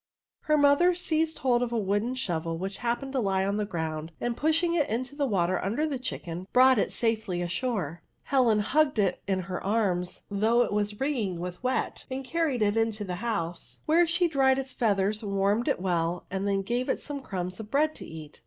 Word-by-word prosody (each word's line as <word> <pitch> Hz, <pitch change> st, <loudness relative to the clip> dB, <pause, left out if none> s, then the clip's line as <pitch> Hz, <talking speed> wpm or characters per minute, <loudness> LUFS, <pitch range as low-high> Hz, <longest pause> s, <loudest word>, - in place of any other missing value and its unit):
Her 305 Hz, 0 st, +3 dB
mother 290 Hz, +5 st, +5 dB
seized 320 Hz, -2 st, 0 dB
hold 245 Hz, -2 st, +2 dB
of 245 Hz, -1 st, -1 dB
a 235 Hz, -, 0 dB
wooden 210 Hz, +4 st, 0 dB
shorel 165 Hz, -8 st, -2 dB
which 190 Hz, +3 st, -4 dB
happened 245 Hz, +3 st, -2 dB
to 265 Hz, -, +1 dB
lie 195 Hz, -4 st, +1 dB
on 200 Hz, +1 st, 0 dB
the 210 Hz, -1 st, -1 dB
ground, 160 Hz, -3 st, -4 dB
and 240 Hz, -1 st, -1 dB
pushing 325 Hz, +4 st, +2 dB
it 315 Hz, -4 st, +1 dB
into 250 Hz, +5 st, -3 dB
the 285 Hz, -1 st, 0 dB
water 185 Hz, -4 st, +1 dB
under 230 Hz, +11 st, 0 dB
the 285 Hz, -4 st, -2 dB
chicken, 180 Hz, -7 st, -5 dB
brought 255 Hz, -1 st, +6 dB
it -, -, 0 dB
safely 220 Hz, -6 st, -1 dB
ashore. 175 Hz, -, -2 dB, 0.2 s
Helen 240 Hz, -6 st, +3 dB
hugged 285 Hz, +4 st, +2 dB
it 195 Hz, -4 st, +1 dB
in 190 Hz, -1 st, +1 dB
her 185 Hz, 0 st, -5 dB
arms, 190 Hz, -4 st, 0 dB
though 220 Hz, +4 st, +3 dB
it -, -, -3 dB
was 210 Hz, 0 st, -1 dB
wringing 230 Hz, -, -1 dB
with 180 Hz, 0 st, -6 dB
wet, 255 Hz, +1 st, -1 dB
and 265 Hz, +1 st, -4 dB
carried 295 Hz, -5 st, 0 dB
it 205 Hz, 0 st, +2 dB
into 225 Hz, -2 st, 0 dB
the 180 Hz, -3 st, -4 dB
house, 175 Hz, -7 st, -3 dB
where 335 Hz, +2 st, +4 dB
she 350 Hz, +1 st, +2 dB
dried 270 Hz, -4 st, +3 dB
its 270 Hz, -1 st, -3 dB
feathers, 205 Hz, -2 st, +1 dB
wanned 200 Hz, +3 st, +1 dB
it -, -, +1 dB
well, 175 Hz, -2 st, -1 dB
and 195 Hz, +1 st, -2 dB
then 195 Hz, -1 st, +1 dB
gave 240 Hz, +5 st, -1 dB
it -, -, +1 dB
some 285 Hz, -1 st, -5 dB
crumbs 185 Hz, -4 st, -4 dB
of 215 Hz, -1 st, -7 dB
bread 305 Hz, +5 st, +2 dB
to -, -, -8 dB
eat. 155 Hz, -2 st, -10 dB
220 Hz, 210 wpm, -28 LUFS, 190-265 Hz, 0.2 s, brought